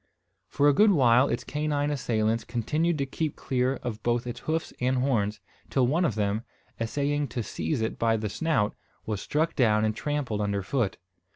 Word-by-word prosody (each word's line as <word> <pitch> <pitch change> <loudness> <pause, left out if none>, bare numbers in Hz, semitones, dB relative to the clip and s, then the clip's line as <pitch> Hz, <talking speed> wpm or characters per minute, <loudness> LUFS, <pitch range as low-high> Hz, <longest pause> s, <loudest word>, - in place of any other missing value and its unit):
For 145 +6 +2
a 145 - +6
good 210 +9 +5
while 130 -7 +5
its 120 - -1
canine 150 0 -1
assailants 115 -4 0
continued 150 +8 0
to 140 - 0
keep 150 +2 -3
clear 130 0 0
of 115 -4 -4
both 120 0 0
its 120 0 -5
hoofs 160 +1 -2
and 130 +1 +2
horns; 115 -6 0 0.3
till 130 -2 +2
one 160 +8 +2
of 115 - 0
them, 105 0 0 0.4
essaying 145 +5 0
to 120 -1 -3
seize 135 +3 -2
it 110 - -2
by 115 -1 +2
the 105 0 -2
snout, 105 -2 0 0.3
was 105 -3 -3
struck 160 +3 0
down 110 -4 +3
and 110 0 0
trampled 140 -8 -2
under 100 -1 -1
foot. 115 -1 -1
125 Hz, 185 wpm, -27 LUFS, 110-145 Hz, 0.4 s, a